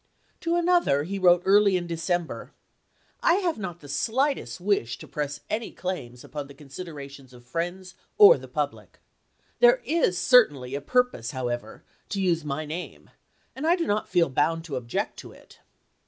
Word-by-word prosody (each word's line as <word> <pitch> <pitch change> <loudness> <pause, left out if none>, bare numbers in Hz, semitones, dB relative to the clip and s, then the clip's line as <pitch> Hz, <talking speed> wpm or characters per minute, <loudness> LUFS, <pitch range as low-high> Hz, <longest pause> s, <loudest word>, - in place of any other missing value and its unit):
To 335 0 0
another 345 - +3
he 195 +5 -4
wrote 180 -1 +5
early 200 -1 +5
in 175 - -4
December: 170 0 -3 0.3
" - - -45 0.3
I 335 - +4
have 360 - -1
not 175 -4 -6
the 145 - -12
slightest 260 - -1
wish 180 - 0
to - - -11
press 145 -1 -4
any 220 +2 -3
claims 125 -10 -6
upon 145 -2 -6
the 140 - -14
consideration 140 -2 -9
of 120 -1 -16
friends 175 +7 -4 0.2
or 425 +3 +9
the - - -11
public. - - -4 0.6
There - - +6
is 315 - +1
certainly 160 - +4
a 140 - -3
purpose, 250 - 0
however, 120 -3 -4 0.3
to 200 - -3
use 175 -4 +1
my 150 +1 -3
name, 165 +4 -7 0.4
and 280 +4 -3
I 340 - +5
do 340 -2 -2
not 210 +1 -1
feel 175 -5 +2
bound 165 +5 +1
to 155 -5 -6
object 120 -2 -3
to - - -10
it." - - -19
175 Hz, 170 wpm, -26 LUFS, 140-215 Hz, 0.6 s, or